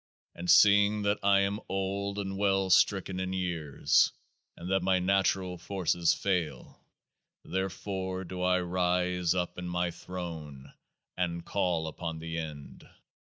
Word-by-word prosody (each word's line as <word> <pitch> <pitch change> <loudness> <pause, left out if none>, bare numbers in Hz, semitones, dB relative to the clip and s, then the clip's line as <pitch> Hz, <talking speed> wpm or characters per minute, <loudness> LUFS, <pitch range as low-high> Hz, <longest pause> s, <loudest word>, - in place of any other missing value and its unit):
And 90 +1 -6
seeing 105 0 +6
that 100 0 +1
I 100 0 +4
am 100 +1 -1
old 100 +1 -2
and 95 -1 -3
well 95 -1 +1
stricken 95 0 +3
in 95 0 -2
years, 85 -6 +1 0.5
and 90 +2 -6
that 95 - +2
my 95 0 +2
natural 95 -1 +1
forces 85 -2 +1
fail, 90 -5 -2 0.6
there 95 +1 -1
fore 95 0 -4
do 90 0 -6
I 90 0 +2
rise 90 0 0
up 90 0 -2
in 90 0 -5
my 90 0 -1
throne 80 -6 -8 0.4
and 85 -2 -2
call 90 -5 0
upon 80 +1 -5
THE 80 +1 -4
END. 75 -3 -8
90 Hz, 140 wpm, -29 LUFS, 85-95 Hz, 0.6 s, seeing